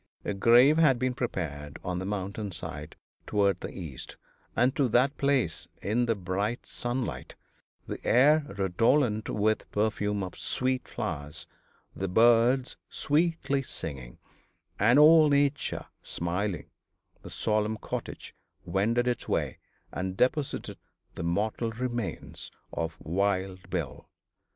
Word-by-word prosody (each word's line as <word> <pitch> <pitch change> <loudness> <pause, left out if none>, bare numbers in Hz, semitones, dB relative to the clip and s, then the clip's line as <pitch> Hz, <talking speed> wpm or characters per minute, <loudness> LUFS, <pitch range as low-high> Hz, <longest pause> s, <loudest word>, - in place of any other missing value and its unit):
A - - -1
grave 120 +9 +6
had 140 -6 +5
been 130 +1 0
prepared 75 - -4
on 90 0 -2
the 95 - -4
mountain 100 +1 -3
side 75 -3 -7 0.3
toward 100 -1 +2
the - - -5
east, 80 -9 -7 0.4
and 125 +3 +3
to 140 -3 +2
that 130 +5 +3
place 135 - +1
in 120 +4 0
the 115 - +2
bright 100 +5 -2
sunlight, 120 0 -4 0.5
the - - -6
air 150 +5 +5
redolent 110 +4 +2
with 110 +1 +2
the - - -18
perfume 105 -1 0
of 90 - -6
sweet 130 0 -1
flowers, 75 +2 -5 0.5
the 95 - -2
birds 120 +5 +4
sweetly 155 -2 +1
singing, 65 - -7 0.6
and 115 +6 +5
all 155 +1 +8
nature 140 0 +1 0.2
smiling, 90 +3 -3 0.5
the - - -10
solemn 110 0 0
cortege - - -6 0.3
wended 115 +5 +1
its 125 - -1
way - - -1 0.3
and 95 0 -4
deposited 135 +4 0 0.3
the - - -6
mortal 105 +7 0
remains 120 -2 -4 0.2
of 80 -1 -3
Wild 95 +1 -1
Bill. 85 -8 -4
110 Hz, 125 wpm, -28 LUFS, 95-125 Hz, 0.6 s, all